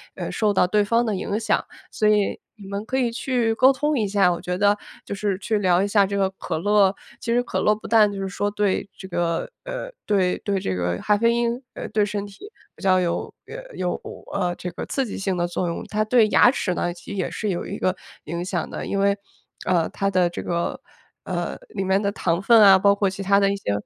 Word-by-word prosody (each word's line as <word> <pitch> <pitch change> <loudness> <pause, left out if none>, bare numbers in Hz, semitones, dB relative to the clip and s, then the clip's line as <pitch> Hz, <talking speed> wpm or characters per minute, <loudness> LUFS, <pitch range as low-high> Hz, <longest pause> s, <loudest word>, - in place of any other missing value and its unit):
呃， - - -4
受 215 -2 +1
到 195 - +3
对 210 +3 +2
方 230 +3 +2
的 215 -3 -1
影 200 +2 -2
响， 220 -2 +1 0.3
所 215 - +1
以 210 -1 +2 0.2
你 205 -3 -12
们 200 +1 -4
可 260 - -1
以 245 -3 +1
去 240 -1 0
沟 255 +4 +6
通 295 +2 0
一 210 - +1
下， 195 -2 +3
我 170 - -6
觉 180 0 -3
得 205 +1 +4 0.3
就 - - -5
是 200 -1 -1
去 210 +2 -1
聊 185 -2 +3
一 - - 0
下 200 -1 +3
这 200 +1 -2
个 195 -1 +3
可 190 - -4
乐 200 +2 +3 0.3
其 230 - -2
实 245 +1 +2
可 - - -2
乐 210 - +3
不 215 - -10
但 215 -3 +5
就 200 - -6
是 195 - -2
说 205 +1 -1
对 205 -1 -1
这 190 - -9
个， 170 -2 -1 0.2
呃， - - -5 0.2
对 190 -3 +2
对 200 -2 -1
这 95 - -2
个 90 0 -1
咖 210 - +2
啡 230 +3 +3
因， 235 0 +1 0.2
呃， - - -5
对 210 - +2
身 205 -1 -3
体 305 - -13 0.2
比 - - -15
较 185 -1 +4
有 175 -2 -2
呃 - - -9
有 180 -1 -1 0.4
呃 180 -3 0
这 180 - -5
个 170 - -6
刺 270 - -1
激 220 - -6
性 195 -2 -1
的 175 0 0
作 175 +1 -2
用， 170 - -4
它 215 0 +1
对 220 0 +4
牙 245 - +6
齿 195 -8 -1
呢， 175 0 -1
其 175 +3 -11
实 200 - -5
也 - - -2
是 215 - -3
有 175 -3 -2
一 200 - -5
个 185 0 0 0.3
影 170 +2 -4
响 180 -2 -3
的， - - -5
因 200 - -2
为， 200 0 +2 0.5
呃， 170 -3 +2
它 195 - -1
的 180 -2 +2
这 175 - -6
个， 170 0 -2 0.4
呃， - - -3
里 195 - -3
面 190 +1 +2
的 200 -1 0
糖 170 -3 -1
分 225 +2 +6
啊， 195 -2 +9
包 200 +1 +4
括 200 -1 +1
其 190 +1 -7
他 200 +1 +4
的 200 0 +3
一 - - -1
些， 195 - -3
200 Hz, 265 characters per minute, -23 LUFS, 185-215 Hz, 0.5 s, 啊